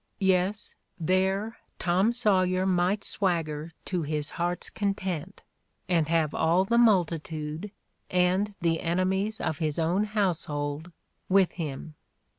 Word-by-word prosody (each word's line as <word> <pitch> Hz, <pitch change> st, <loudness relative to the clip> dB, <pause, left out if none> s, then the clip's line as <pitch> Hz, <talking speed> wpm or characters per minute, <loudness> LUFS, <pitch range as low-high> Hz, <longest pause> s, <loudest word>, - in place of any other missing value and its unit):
Yes, 190 Hz, +1 st, +1 dB, 0.3 s
there 190 Hz, +6 st, 0 dB, 0.2 s
Tom 185 Hz, +5 st, +2 dB
Sawyer 185 Hz, -5 st, +2 dB
might 185 Hz, +2 st, +1 dB
swagger 165 Hz, -5 st, -1 dB
to 180 Hz, -2 st, -1 dB
his 150 Hz, -1 st, -2 dB
heart's 175 Hz, 0 st, -2 dB
content 195 Hz, -4 st, -3 dB, 0.4 s
and 165 Hz, -4 st, +2 dB
have 160 Hz, -2 st, +2 dB
all 170 Hz, +3 st, +3 dB
the 235 Hz, +4 st, +2 dB
multitude, 165 Hz, -5 st, +1 dB, 0.4 s
and 185 Hz, +3 st, +2 dB
the 165 Hz, -1 st, +1 dB
enemies 190 Hz, +5 st, 0 dB
of 155 Hz, -, -2 dB
his 155 Hz, -2 st, -1 dB
own 175 Hz, +5 st, +1 dB
household, 160 Hz, -6 st, -2 dB, 0.4 s
with 195 Hz, -1 st, +4 dB
him. 155 Hz, -2 st, -6 dB
180 Hz, 115 wpm, -27 LUFS, 160-195 Hz, 0.4 s, with